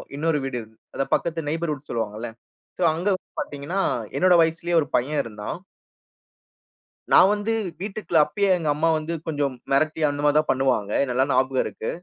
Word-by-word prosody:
இன்னொரு 155 +1 +1
வீடு 135 -2 -3
இருந் 110 0 -16 0.2
அத - - 0
பக்கத்து 165 -2 -1
நெய்பர்ஹூட் 150 -3 -3
சொல்லுவாங்கள்ல. 110 0 -3 0.5
சோ - - -7
அங்க 175 +5 -3
வந்து - - -14
பார்த்தீங்கன்னா, 145 +7 -4 0.4
என்னோட 185 0 +5
வயசுலேயே 170 +1 0
ஒரு 145 - -3
பையன் 145 +5 +1
இருந்தான். 105 +4 -6 1.6
நான் 190 - +8
வந்து 210 +2 -1 0.3
வீட்டுக்குள்ள, 200 -4 -2
அப்பயே 200 +6 0
எங்க 160 -3 -2
அம்மா 160 +2 +2
வந்து 155 +2 -4
கொஞ்சம் 145 -4 -1 0.2
மிரட்டி, 155 +3 +1
அந்த 145 0 -3
மாரி 145 0 +4
தான் 155 - -2
பண்ணுவாங்க. 130 -6 0
ஏன் 140 - 0
நல்லா 130 +2 +2
ஞாபகம் 130 0 +2
இருக்கு. - - -5
150 Hz, 165 wpm, -24 LUFS, 130-165 Hz, 1.6 s, நான்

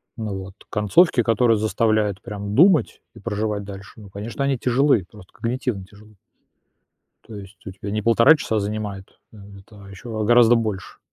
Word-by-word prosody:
Вот. 100 -4 -6 0.2
Концовки, 120 - +3
которые 115 0 +2
заставляют 110 -2 0
прям 100 -1 -6
думать 170 - +3
и - - -14
проживать 105 -1 -3
дальше, 100 +1 -11
ну, 100 - -13
конечно, 110 +6 -5
они 140 -2 0
тяжелы, 125 - +2
просто 95 -4 -16
когнитивно 115 -3 -3
тяжелы. 105 +2 -19 1.1
То 110 - -11
есть 100 0 -13
у 95 - -5
тебя 95 +2 -8
не 105 +1 -2
1,5 115 +7 +5
часа 110 -6 -2
занимает 100 -1 -5
это, 100 0 -15
а - - -13
ещё 110 +2 -5
гораздо 120 +1 +5
больше. 110 -4 -4
105 Hz, 155 wpm, -22 LUFS, 100-115 Hz, 1.1 s, 1,5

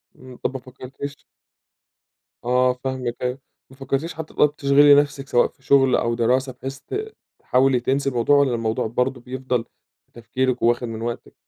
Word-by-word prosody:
امم، 130 -1 -13
طب - - -3
ما 130 - -4
فكرتيش 135 +2 -9 1.2
آه 125 +1 +3
فاهمِك 130 -2 -3
أيوه، 125 +1 -2 0.3
ما 130 - -16
فكرتيش 140 +4 -2
حتى 160 -1 -8
طب 150 0 +3
تشغلي 145 0 +6
نفسِك 145 -1 +1
سواء 120 -3 +3
في 130 - -25
شغل 135 -1 +4
أو 115 0 0
دراسة 125 +3 +1
بحيث 135 +2 -7
ت 430 - -6 0.2
تحاولي 130 0 +2
تنسي 135 +3 0
الموضوع 125 +3 +2
والّا 135 -4 +3
الموضوع 115 -1 -1
برضه 125 +2 -1
بيفضل 125 -1 -3 0.4
في - - -43
تفكيرِك 130 +2 -2
وواخد 120 +1 +2
من 115 -1 -6
وقتِك؟ 120 0 -5
130 Hz, 165 wpm, -22 LUFS, 120-140 Hz, 1.2 s, تشغلي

